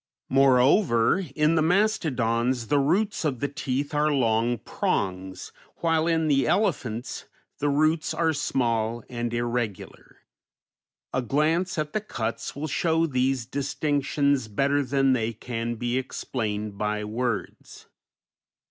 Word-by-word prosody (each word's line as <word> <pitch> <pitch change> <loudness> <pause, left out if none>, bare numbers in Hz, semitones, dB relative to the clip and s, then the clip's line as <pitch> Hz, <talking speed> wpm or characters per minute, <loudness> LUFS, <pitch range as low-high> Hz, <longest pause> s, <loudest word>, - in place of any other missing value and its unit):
Moreover, 135 - +4
in 150 +1 +3
the 160 - +3
mastodons 130 - +1
the 145 - +3
roots 185 +9 +1
of 140 -6 -1
the 145 - 0
teeth 140 0 -3
are 150 +1 +2
long 120 -3 +2
prongs, 95 -2 -3 0.2
while 165 -1 +1
in 160 -1 +2
the 135 -4 +2
elephants 130 - -1 0.3
the 145 - +1
roots 155 +3 +2
are 165 -1 +1
small 120 -5 -1
and 120 -1 -3
irregular. 120 -4 -4 0.9
A 130 - +1
glance 155 - 0
at 150 -1 -2
the 215 - 0
cuts 115 - -4
will 145 +2 -4
show 165 +1 +1
these 130 -3 0
distinctions 140 -1 0
better 140 +7 +1
than 135 0 +2
they 115 -2 -1
can 115 +1 -4
be 120 +2 -1
explained 105 -5 -4
by 105 0 -1
words. 115 +1 -4
135 Hz, 125 wpm, -26 LUFS, 115-150 Hz, 0.9 s, Moreover